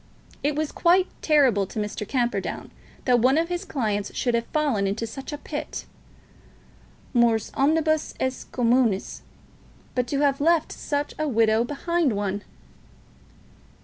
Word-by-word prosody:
It 290 0 0
was 305 0 -1
quite 360 +2 +4 0.2
terrible 260 -11 +3
to - - -10
Mr. 210 0 -3
Camperdown 245 -2 -2 0.3
that 245 -2 +4
one 260 +5 +4
of 335 +1 +1
his 350 0 -2
clients 210 -7 -2
should 245 - 0
have 230 0 0
fallen 275 -11 +1
into 210 +4 -2
such 270 +6 -7
a 295 - -4
pit. - - -6 1.3
Mors 235 -3 +3
omnibus 310 +2 +1
est 260 0 -3
communis. 235 -4 +1 0.7
But 250 -1 0
to 280 +2 -1
have 280 -1 +2
left 330 +1 +3
such 290 0 -3
a 310 - 0
widow 225 -3 +3
behind 295 +2 0
one! 200 0 -2
260 Hz, 140 wpm, -25 LUFS, 225-300 Hz, 1.3 s, quite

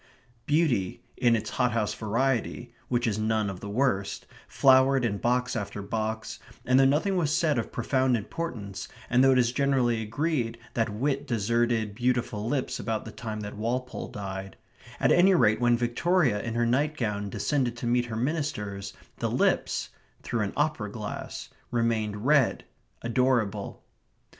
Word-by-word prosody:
Beauty, 145 - +1
in 120 -2 +3
its 110 - -3
hothouse 115 -4 0
variety 120 +1 -1
(which 120 -1 0
is 110 -2 0
none 110 -2 0
of 95 - -8
the 100 - -7
worst), 100 -4 0 0.2
flowered 130 -1 +4
in 100 -3 -1
box 125 +1 0
after 100 -2 -4
box; 110 +2 -3 0.3
and 130 +2 +4
though 135 - +6
nothing 155 +8 +2
was 155 -5 +1
said 155 -5 +2
of 115 - -4
profound 130 +1 +1
importance, 105 - -5 0.2
and 125 +1 +5
though 135 0 +6
it - - +3
is 120 -1 +3
generally 125 -4 +1
agreed 120 +1 -1 0.2
that 115 -2 0
wit 135 +7 -1
deserted 115 -1 +1
beautiful 120 -2 -1
lips 130 -1 -1
about 110 -2 -2
the 115 - -7
time 110 -1 -5
that 105 0 -6
Walpole 125 +4 -3
died 95 -3 -6 0.4
at - - +3
any 185 +2 +6
rate 110 -8 +3
when 120 0 +4
Victoria 120 - +1
in 115 -1 -4
her 120 0 +2
nightgown 120 -6 0
descended 125 0 -1
to 120 - -5
meet 120 +1 +2
her 115 -2 -5
ministers, 110 -8 -2 0.2
the - - -1
lips - - +1 0.3
(through 120 - -1
an 100 -2 -2
opera 150 -9 0
glass) 105 -2 -6 0.2
remained 110 -2 -1
red, 140 -4 +3 0.4
adorable. 120 -3 0
120 Hz, 155 wpm, -27 LUFS, 110-130 Hz, 0.4 s, though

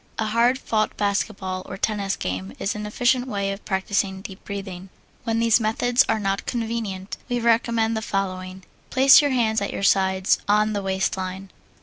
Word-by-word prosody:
A 220 - -1
hard 235 +4 +2
fought 215 -4 -1
basketball 200 -2 -1
or - - -7
tennis 200 -1 -1
game 95 +1 -4
is 195 - -2
an 210 0 -5
efficient 245 +3 +1
way 200 -4 -2
of 195 +1 -7
practising 190 0 -1
deep 190 -1 -10
breathing. 195 -2 -7 0.4
When 225 0 0
these 230 0 +4
methods 240 +3 +2
are 220 - +2
not 195 -1 -2
convenient, 220 -5 -3
we 245 0 0
recommend 230 -1 +2
the 220 - -2
following: 185 -2 -3 0.3
Place 270 +2 +7
your 290 - +1
hands 225 -5 +1
at 200 - -2
your - - -4
sides, 190 -1 +3
on 210 +1 +3
the 205 - -1
waist 190 -1 -1
line. 190 +1 -5
205 Hz, 180 wpm, -23 LUFS, 190-230 Hz, 0.4 s, Place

